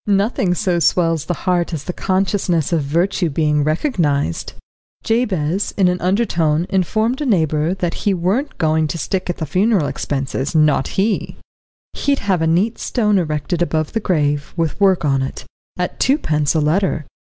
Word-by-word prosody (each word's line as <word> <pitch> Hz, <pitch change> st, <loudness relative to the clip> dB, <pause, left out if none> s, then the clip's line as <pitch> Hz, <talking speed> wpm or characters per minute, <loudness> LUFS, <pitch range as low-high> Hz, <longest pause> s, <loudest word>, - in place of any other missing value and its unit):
Nothing 200 Hz, -2 st, +1 dB
so 175 Hz, 0 st, 0 dB
swells 165 Hz, -2 st, +2 dB
the 175 Hz, -, -2 dB
heart 175 Hz, -2 st, +1 dB
as 145 Hz, -, -6 dB
the 180 Hz, -, -4 dB
consciousness 185 Hz, -4 st, 0 dB
of 165 Hz, -, +2 dB
virtue 170 Hz, +5 st, 0 dB
being 150 Hz, 0 st, +1 dB
recognised. 155 Hz, -, -1 dB, 0.5 s
Jabez 200 Hz, -6 st, 0 dB
in 190 Hz, -3 st, +4 dB
an 180 Hz, 0 st, 0 dB
undertone 175 Hz, -5 st, +1 dB
informed 220 Hz, -, 0 dB
a -, -, -1 dB
neighbour 160 Hz, -, +1 dB
that 175 Hz, -2 st, -2 dB
he 205 Hz, -, +1 dB
weren't 195 Hz, -, -1 dB
goin' 160 Hz, -1 st, +1 dB
to 170 Hz, -, -4 dB
stick 185 Hz, +5 st, -3 dB
at 175 Hz, -, -2 dB
the 160 Hz, -, -3 dB
funeral 190 Hz, +2 st, +2 dB
expenses, 135 Hz, +2 st, -3 dB
not 150 Hz, -3 st, +3 dB
he; 205 Hz, +2 st, 0 dB, 0.6 s
he'd 280 Hz, -1 st, 0 dB
have 190 Hz, -7 st, 0 dB
a 160 Hz, -, +2 dB
neat 185 Hz, +8 st, +1 dB
stone 210 Hz, -5 st, +1 dB
erected 160 Hz, +1 st, -2 dB
above 155 Hz, -3 st, -1 dB
the 225 Hz, -, +1 dB
grave 150 Hz, -7 st, -1 dB
with 165 Hz, +3 st, -1 dB
work 190 Hz, -5 st, +3 dB
on 135 Hz, -2 st, +2 dB
it, 135 Hz, -, -5 dB, 0.3 s
at 180 Hz, 0 st, -3 dB
twopence 155 Hz, -, +1 dB
a -, -, +3 dB
letter. 155 Hz, +1 st, 0 dB
175 Hz, 165 wpm, -19 LUFS, 155-195 Hz, 0.6 s, in